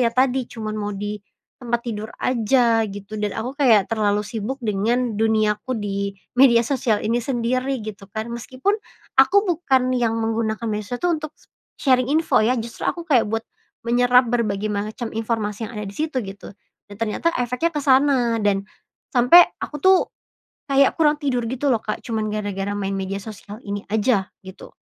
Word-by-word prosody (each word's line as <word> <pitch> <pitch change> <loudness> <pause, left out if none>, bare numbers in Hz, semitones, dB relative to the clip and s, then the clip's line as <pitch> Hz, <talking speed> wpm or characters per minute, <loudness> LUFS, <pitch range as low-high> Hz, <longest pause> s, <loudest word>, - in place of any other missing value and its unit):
ya 240 - +4
tadi 255 +1 +2
cuman 215 -2 -5
mau 205 0 -3
di 205 +1 -4 0.4
tempat 235 -1 -1
tidur 215 -2 -4
aja 235 -1 +3
gitu, 205 +1 -8
dan 210 -1 -2
aku 240 +4 -3
kayak 230 -8 +5
terlalu 210 -2 +1
sibuk 225 +4 -4
dengan 225 +4 0
duniaku 220 +2 +1
di 200 -1 -3 0.3
media 240 -3 +7
sosial 240 -4 0
ini 230 +2 +1
sendiri, 255 +1 -1
gitu 200 -2 -8
kan. 220 +1 -4
Meskipun 255 - -1 0.5
aku 400 +9 +4
bukan 265 -8 +1
yang 230 -2 +1
menggunakan 225 0 -1
medsos 210 +2 -3
tuh 350 -1 +2
untuk 310 -1 -6 0.5
sharing 255 -2 +3
info 320 +1 +3
ya, 250 +3 +2
justru 230 +1 -6
aku 340 -1 -3
kayak 255 -9 +3
buat 225 0 -2 0.4
menyerap 245 +1 +4
berbagai 215 -3 0
macam 215 +3 -4
informasi 220 -1 -2
yang 235 - -10
ada 210 - -4
di 195 - -7
situ, 310 -2 -2
gitu. 195 +1 -9 0.4
Dan 205 - -11
ternyata 225 +9 0
efeknya 250 +7 0
ke 295 - 0
sana 260 -4 +3
dan 195 -1 +1 0.5
sampe 250 +7 +8 0.2
aku 295 - -5
tuh 375 -1 +6 0.7
kayak 275 0 +4
kurang 300 -1 +4
tidur 250 -4 0
gitu 265 +2 0
loh, 230 - +2
Kak, 215 - -4
cuman 220 -2 -2
gara-gara 205 -1 -3
main 195 -1 -2
media 195 0 -3
sosial 210 -1 -9
ini 200 0 -4
aja, 215 -2 +2 0.2
gitu. 190 0 -11
230 Hz, 170 wpm, -22 LUFS, 210-255 Hz, 0.7 s, sampe